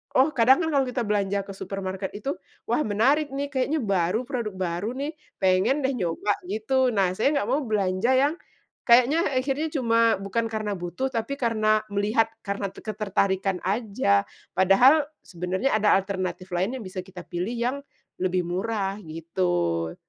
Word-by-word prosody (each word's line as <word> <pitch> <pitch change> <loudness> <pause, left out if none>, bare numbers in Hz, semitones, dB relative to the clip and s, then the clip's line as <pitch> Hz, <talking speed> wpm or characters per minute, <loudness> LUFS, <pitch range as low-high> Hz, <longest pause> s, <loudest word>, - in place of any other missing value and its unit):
oh, 265 +4 +5
kadangkan 265 +7 +4
kalau 275 -2 +3
kita 250 0 -2
belanja 200 -2 0
ke 195 - -17
supermarket 190 0 -5
itu, 270 +8 -3 0.3
"Wah, - - +2
menarik 270 +9 +2
nih, 280 +1 -2
kayaknya 280 +3 0
baru, 195 +1 +1
produk 235 -6 -3
baru 185 +3 -2
nih, 295 +3 -3 0.3
pengen 190 +10 +3
deh 265 - +2
nyoba," 185 +1 0
gitu. 250 +6 +1
Nah, 195 -2 +3
saya 280 +7 +2
nggak 205 - -3
mau 275 +4 +2
belanja 205 +2 +1
yang 285 +4 +3 0.5
kayaknya 265 +7 +4
akhirnya 270 +4 0
cuma 230 -5 +3
bukan 210 +4 -1
karena 215 -2 -2
butuh, 175 +10 -3
tapi 235 +4 -2
karena 215 -2 +2
melihat, 210 +3 +1 0.2
karena 200 0 -2
te - - -12
ketertarikan 195 -3 0
aja. 195 - +1 0.3
Padahal, 250 - +5 0.2
sebenarnya 185 +8 -2
ada 215 -1 +4
alternatif 190 -1 -3
lain 195 +9 0
yang - - -7
bisa 185 0 -5
kita 185 -2 -10
pilih 180 +7 -3
yang 245 +4 0 0.4
lebih 185 -1 +1
murah, 195 +2 -2
gitu. 90 - -1
210 Hz, 155 wpm, -25 LUFS, 185-255 Hz, 0.5 s, oh